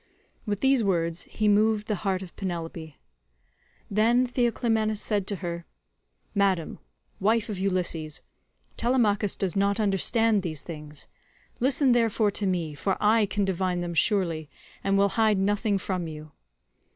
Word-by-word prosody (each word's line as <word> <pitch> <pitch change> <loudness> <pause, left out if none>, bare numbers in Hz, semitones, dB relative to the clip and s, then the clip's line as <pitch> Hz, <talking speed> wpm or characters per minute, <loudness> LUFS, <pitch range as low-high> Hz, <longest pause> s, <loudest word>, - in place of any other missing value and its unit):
With 205 -1 -2
these 265 -3 +3
words 170 -3 0
he 215 - -1
moved 210 +1 +3
the 210 -2 -1
heart 195 -2 -1
of 180 - -12
Penelope. 165 -4 -5 0.9
Then 230 +5 +3
Theoclymenus 235 -3 0
said 205 -3 -1
to 205 - -1
her: 170 0 -5 0.7
"Madam, 195 -5 0 0.4
wife 220 +3 +1
of 200 -3 -4
Ulysses, 175 -5 -2 0.5
Telemachus 220 -5 +2
does 195 -1 -1
not 200 +2 +1
understand 210 +2 +2
these 160 -5 -4
things; 150 -3 -8 0.5
listen 265 +1 +3
therefore 225 -3 +2
to 200 0 -2
me, 170 -5 -1
for 190 +7 -1
I 215 0 +3
can 200 0 0
divine 185 -1 -1
them 175 -1 -3
surely, 165 -4 +1 0.3
and 195 0 +2
will 200 0 +4
hide 220 -1 +2
nothing 205 +2 +1
from 185 -3 -3
you. 155 -1 -9
200 Hz, 140 wpm, -26 LUFS, 175-215 Hz, 0.9 s, will